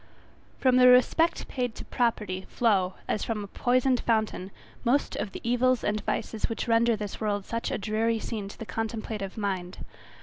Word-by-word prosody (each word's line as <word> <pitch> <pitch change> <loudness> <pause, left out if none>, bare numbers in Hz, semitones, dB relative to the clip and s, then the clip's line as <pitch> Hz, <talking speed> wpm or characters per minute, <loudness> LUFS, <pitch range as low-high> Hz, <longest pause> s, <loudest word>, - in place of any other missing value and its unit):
>From 255 -1 +3
the 250 0 +7
respect 250 +7 +4
paid 245 -4 -2
to - - -8
property 210 -6 -1
flow, 195 -6 +2
as 215 - -1
from 215 -2 -2
a - - -7
poisoned 255 +3 +2
fountain, 220 -4 0 0.3
most 255 +4 +1
of 200 - -3
the - - -8
evils 245 0 +2
and 210 0 0
vices 220 0 -2
which 225 - -3
render 230 0 +4
this 210 0 -6
world 205 -2 -1
such 230 0 -3
a - - -1
dreary 220 +3 0
scene 215 -2 -4
to 200 - -10
the 225 - -7
contemplative 220 -3 -4
mind. 190 -3 -3
225 Hz, 175 wpm, -27 LUFS, 205-245 Hz, 0.3 s, the